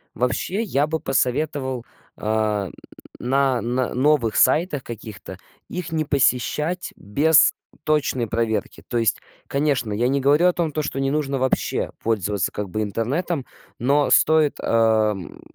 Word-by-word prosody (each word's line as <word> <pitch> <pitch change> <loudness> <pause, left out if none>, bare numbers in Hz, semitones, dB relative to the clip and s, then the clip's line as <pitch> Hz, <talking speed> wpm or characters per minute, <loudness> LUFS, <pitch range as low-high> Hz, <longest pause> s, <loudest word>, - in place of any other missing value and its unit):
Вообще, 125 - -1
я 150 -8 +1
бы 160 +1 -2
посоветовал, 130 -1 -1 0.3
а, 105 -2 0 0.5
на 135 0 +1
на 125 +2 -1
новых 130 -4 +2
сайтах 150 +1 +3
каких-то, 110 -3 -9 0.3
их 175 -2 -5
не 160 -1 0
посещать 150 +5 0
без 145 +10 +4 0.3
точной 145 -5 +1
проверки. 115 0 -2
То 120 - -1
есть, 115 -1 +1 0.3
конечно, 140 -6 0
я 120 +4 +1
не 140 +1 +1
говорю 145 +6 +4
о - - +3
том, 165 -4 -1
то, 155 - -1
что 135 - -4
не 135 0 0
нужно 140 -3 -1
вообще 130 0 -1
пользоваться, 105 -4 0
как 105 -1 -5
бы, 110 +4 -2
интернетом, 130 - -2 0.3
но 140 +4 +2
стоит, 155 -2 +4
ам, 110 -4 +1
130 Hz, 140 wpm, -22 LUFS, 115-150 Hz, 0.5 s, без